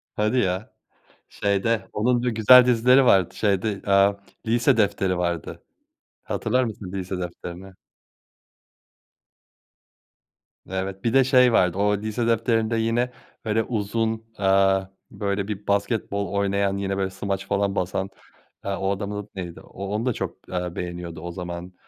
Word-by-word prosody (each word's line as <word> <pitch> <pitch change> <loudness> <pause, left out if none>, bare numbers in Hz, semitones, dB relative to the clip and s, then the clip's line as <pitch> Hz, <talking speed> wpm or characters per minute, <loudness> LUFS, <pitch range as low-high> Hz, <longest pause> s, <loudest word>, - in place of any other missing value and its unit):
Hadi 105 +4 +1
ya. 95 -1 -1 0.6
Şeyde 100 +1 0
onun 120 +3 +1
dü 125 - +1
güzel 120 +3 +7
dizileri 125 +2 +5
vardı 95 -5 +4
şeyde, 100 0 0
eee, 100 0 +4 0.3
Lise 120 +3 +3
Defteri 100 -3 +1
vardı 85 -3 -3 0.6
hatırlar 125 +4 0
mısın 105 -5 -6
Lise 95 -1 -4
Defteri'ni? 90 +2 -7 3.0
Evet 95 0 -4
bir 115 +1 0
de 135 -1 +6
şey 125 -2 +5
vardı 90 -1 +3
o 105 0 +2
Lise 110 +3 -2
Defteri'nde 115 0 +1
yine 115 +2 0 0.3
böyle 110 +1 +1
uzun, 110 0 -2
eee, 95 0 +3 0.2
böyle 100 -1 -2
bir 105 -1 -6
basketbol 100 -1 -1
oynayan 100 0 0
yine 100 0 -2
böyle 95 -1 0
smaç 95 0 -4
falan 100 0 0
basan, 95 +1 -2 0.6
eee, 100 - -2
o 95 0 -1
adamın 100 +1 -4
neydi 90 -3 -7
o 100 +1 -8
onu 105 +4 -2
da 125 - +1
çok, - - -6
eee, 90 -1 -3
beğeniyordu 85 -2 -6
o 85 0 -5
zaman, 90 0 -7
100 Hz, 135 wpm, -24 LUFS, 95-110 Hz, 3.0 s, güzel